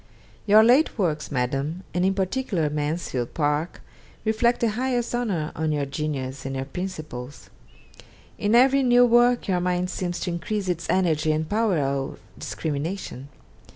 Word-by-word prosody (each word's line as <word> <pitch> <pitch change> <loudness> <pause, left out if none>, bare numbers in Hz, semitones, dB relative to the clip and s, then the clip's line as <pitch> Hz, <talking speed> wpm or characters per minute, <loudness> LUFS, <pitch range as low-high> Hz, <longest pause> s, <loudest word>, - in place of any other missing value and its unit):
'Your 215 +2 +7
late 250 +7 +4
works, 155 -8 -1
Madam, 140 +7 -2
and 180 - 0
in 190 +1 +2
particular 190 - -1
"Mansfield 150 -4 -3
Park," 150 +2 -1 0.4
reflect 230 +2 +2
the 230 - +3
highest 245 +1 -1
honour 200 -11 -1
on 160 -1 -1
your 145 -2 0
genius 135 -2 -4
and 135 0 -4
your 135 0 -3
principles. 155 -6 -7 0.9
In 210 +3 +2
every 270 +3 +5
new 245 -1 +5
work 240 +1 +4
your 185 -2 +1
mind 180 0 -1
seems 175 -1 -3
to 180 - -2
increase 195 +4 -3
its 170 -2 -2
energy 160 -4 +2
and 155 0 -1
power 215 -2 +1
of 135 -1 -2 0.2
discrimination. 150 -3 -4
175 Hz, 150 wpm, -24 LUFS, 150-215 Hz, 0.9 s, Your